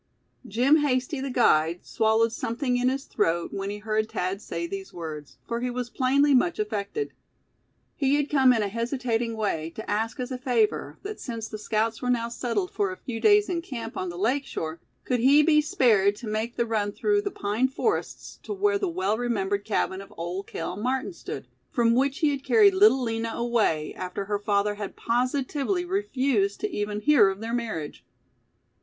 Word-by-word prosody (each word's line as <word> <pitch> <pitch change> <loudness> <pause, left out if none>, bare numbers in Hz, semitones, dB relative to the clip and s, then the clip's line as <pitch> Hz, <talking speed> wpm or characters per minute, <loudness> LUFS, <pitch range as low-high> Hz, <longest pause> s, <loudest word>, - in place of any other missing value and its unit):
Jim 250 +8 +4
Hasty, 270 -1 0
the 275 - -3
guide, 170 -9 +2
swallowed 220 +1 +2
something 245 +3 -2
in 250 +1 +2
his 270 +1 -2
throat, 170 +1 0
when 195 0 -3
he 205 - -4
heard 215 +1 -1
Thad 185 +3 -2
say 170 -3 -4
these 195 +2 -6
words, 155 -4 -7
for 235 0 -2
he 250 - -1
was 245 0 -4
plainly 280 +2 +3
much 330 +7 +3
affected. 215 - -3 0.8
He 275 -1 +2
had 290 -1 +1
come 265 -4 +5
in 225 -4 +2
a - - 0
hesitating 230 +1 -2
way 165 -7 -1
to 220 - -7
ask 220 +5 -1
as 250 +1 -4
a 255 - -4
favor 240 -5 0
that, 415 +1 -6
since 230 -3 -5
the 215 - -7
scouts 220 +1 -1
were 250 - -2
now 235 -1 +1
settled 230 -5 -2
for 200 -2 0
a 185 - -7
few 230 -3 -6
days 415 - +5
in 345 -2 -1
camp 235 -9 -6
on 185 - -3
the 175 - -7
lake 250 +9 +1
shore, 160 +1 -4 0.3
could 250 -1 0
he 280 +5 +6
be 300 -1 +5
spared 215 -9 +3
to 225 - -9
make 220 +3 -2
the 235 - +1
run 215 -3 -1
through 410 - +1
the 405 - -2
pine 220 - 0
forests 420 +11 -3
to - - -5
where 405 0 +1
the 390 - 0
well 210 - -1
remembered 205 -4 -1
cabin 195 -2 -1
of 195 - -13
Old 175 +4 -4
Cale 165 +2 -4
Martin 255 - -1
stood, - - -7 0.2
from 230 -2 +2
which 270 +5 +1
he 305 -2 +4
had 275 -1 -4
carried 410 +1 +5
Little 375 -9 +5
Lina 225 -1 -2
away, 225 -11 0
after 185 +2 -5
her 205 0 -1
father 205 0 +1
had 205 -1 -6
positively 275 +8 0
refused 270 - 0
to 420 - -2
even 210 0 -3
hear 290 -8 +5
of 195 0 -4
their 225 +1 -4
marriage. 220 -11 -4
230 Hz, 195 wpm, -26 LUFS, 205-270 Hz, 0.8 s, he